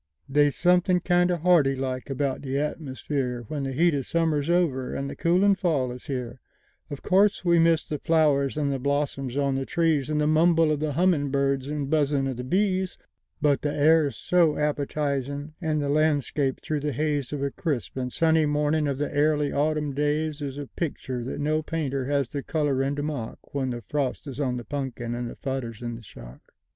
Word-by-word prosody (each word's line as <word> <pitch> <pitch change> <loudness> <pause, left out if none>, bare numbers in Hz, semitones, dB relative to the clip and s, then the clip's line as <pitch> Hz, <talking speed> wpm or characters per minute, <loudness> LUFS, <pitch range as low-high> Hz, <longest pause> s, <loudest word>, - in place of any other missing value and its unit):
They's 145 +1 +3
something 180 +1 +3
kindo' 175 0 +2
harty 160 -6 +4
like 130 0 -4
about 135 0 -1
the 135 -1 -4
atmusfereWhen 140 -2 -3
the 135 - -2
heat 165 +5 +3
of 140 -3 -2
summer's 160 -3 0
over 160 -8 +1
and 140 - -3
the - - -6
coolin' 185 +4 +3
fall 155 -9 0
is 125 0 -10
here—Of 130 +2 -8
course 195 0 +3
we 170 -1 +4
miss 165 -1 +3
the 150 - -3
flowers, 150 -3 +2
and 145 -2 0
the 135 - -2
blossoms 140 -1 -1
on 140 -1 +1
the 135 0 -1
trees, 160 -5 +1
And 150 -1 0
the 150 - +2
mumble 160 +1 +4
of 150 - 0
the 155 -1 -1
hummin' 165 -3 +2
birds 140 -1 0
and 145 -1 -3
buzzin' 145 -2 +1
of 130 -3 -3
the 125 - -4
bees; 185 +4 0 0.5
But 145 -2 +3
the 145 - -1
air's 150 0 +3
so 170 -4 +3
appetizin'; 145 -1 -2
and 155 -2 0
the 145 - -1
landscape 145 -2 +1
through 155 -1 -2
the 145 0 -2
hazeOf 145 0 -1
a 140 - -2
crisp 145 -7 -3
and 125 -1 -3
sunny 160 0 +3
morning 150 +1 +1
of 140 -2 -1
the 145 0 -3
airly 150 0 +2
autumn 150 0 0
daysIs 145 -1 -1
a 145 - -5
pictur' 130 -5 -4
that 130 - -5
no 155 +2 +1
painter 145 -5 -2
has 140 -2 0
the 140 - -4
colorin' 140 -2 0
to 145 - -3
mock—When 140 -1 -4
the 120 -1 -5
frost 140 -2 -2
is 140 -2 -7
on 130 -4 0
the 120 - -7
punkin 130 -2 -4
and 120 0 -3
the - - -9
fodder's 125 -5 -4
in 120 -1 -4
the 115 - -10
shock. 65 - -13
145 Hz, 190 wpm, -26 LUFS, 135-155 Hz, 0.5 s, harty